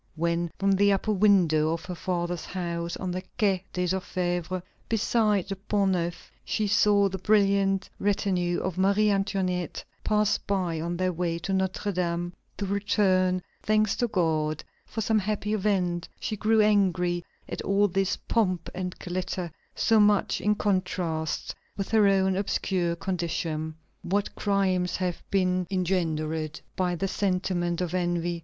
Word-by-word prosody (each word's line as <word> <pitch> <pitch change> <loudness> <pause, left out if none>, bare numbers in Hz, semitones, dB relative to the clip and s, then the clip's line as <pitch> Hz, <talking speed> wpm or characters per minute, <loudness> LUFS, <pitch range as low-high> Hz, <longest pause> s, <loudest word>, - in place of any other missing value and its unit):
When, 170 +1 0
from 195 0 +2
the 200 +1 +4
upper 195 +3 0
window 180 -6 +4
of 165 -1 -5
her 180 - -5
father's 175 -1 -2
house 170 -2 -3
on 185 -1 -3
the 185 +1 -3 0.2
Quai 195 -4 +2
des 180 - -1
Orfèvres, 180 -1 -2 0.3
beside 215 -3 +2
the 195 - -3
Pont 200 0 0
Neuf, 175 -1 -3
she 215 - -1
saw 205 0 +4
the 190 0 -4
brilliant 195 -1 +3
retinue 190 -4 +1
of 185 -1 -3
Marie 200 +2 +3
Antoinette 190 -3 -1 0.2
pass 210 -1 +2
by 180 -5 -1
on 170 +1 -2
their 185 0 0
way 170 0 -1
to 195 +4 -3
Notre 190 +2 0
Dame 175 -1 -1 0.2
to 200 - -2
return 190 -2 +2 0.2
thanks 215 -1 +2
to 240 - +1
God 160 -6 0 0.2
for 220 - -4
some 220 +1 +2
happy 210 +1 -2
event, 185 -4 0
she 215 - -3
grew 220 +1 +3
angry 180 -4 +2 0.2
at - - -5
all 200 +1 +3
this 195 0 0
pomp 185 -7 -1
and 180 0 -4
glitter, 180 -1 -3 0.2
so 225 -1 +3
much 205 -1 +3
in 210 0 +2
contrast 180 -6 -1 0.2
with 195 - -3
her 215 -2 +5
own 190 -1 +3
obscure 185 -3 0
condition. 165 -3 -3 0.3
What 200 +3 -1
crimes 190 -3 +1
have 180 -2 -2
been 185 -2 +1
engendered 160 -5 -1 0.2
by 180 -1 0
the 195 +3 -1
sentiment 180 -3 0
of 175 -1 -2
envy! 175 -1 0
185 Hz, 150 wpm, -27 LUFS, 175-200 Hz, 0.3 s, her